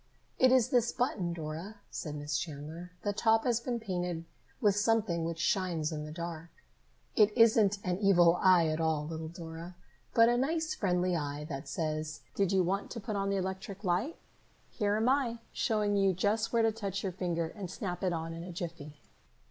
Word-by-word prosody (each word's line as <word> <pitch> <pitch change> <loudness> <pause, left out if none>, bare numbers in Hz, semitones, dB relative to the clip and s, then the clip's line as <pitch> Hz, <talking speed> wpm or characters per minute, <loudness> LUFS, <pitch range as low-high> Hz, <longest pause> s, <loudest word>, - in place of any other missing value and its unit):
"It 260 -1 +6
is 255 -4 +4
this 240 -2 +3
button, 215 -9 -1
Dora," 165 +5 -5 0.2
said 150 -2 -5
Miss 145 0 -3
Chandler. 160 +3 -5
"The 205 - 0
top 225 +1 +3
has 240 -2 +2
been 240 0 -2
painted 180 -5 -3 0.3
with 205 -2 +3
something 205 -6 +1
which 165 0 -3
shines 170 -2 0
in 150 -1 -4
the 155 - -7
dark. 170 0 -6 0.7
It 210 -3 +6
isn't 220 -3 +5
an 180 -1 -1
evil 175 -4 +5
eye 185 -3 +6
at 155 +1 0
all, 160 -2 +1
little 160 0 -5
Dora, 165 +1 -8 0.4
but 230 0 +7
a 240 0 +3
nice 320 +6 0
friendly 180 - +1
eye 145 -2 -3
that 140 0 -5
says, 155 -1 -3
'Did 195 -2 +1
you 190 -1 +4
want 195 +3 -1
to 235 - -5
put 215 0 -4
on 195 0 0
the 200 - +1
electric 190 +2 -4
light? 195 - 0 0.6
Here 205 -2 0
am 220 +2 +1
I, 255 -3 +2 0.2
showing 210 -2 +1
you 195 -1 +3
just 210 +5 0
where 230 -1 +3
to 225 - +4
touch 200 -3 -4
your 190 - -1
finger 170 -2 -2
and 195 -4 -7
snap 185 -2 -4
it 185 - +2
on 165 -1 -3
in 165 0 -6
a 180 - -7
jiffy! 150 -4 -7
185 Hz, 195 wpm, -31 LUFS, 165-215 Hz, 0.7 s, but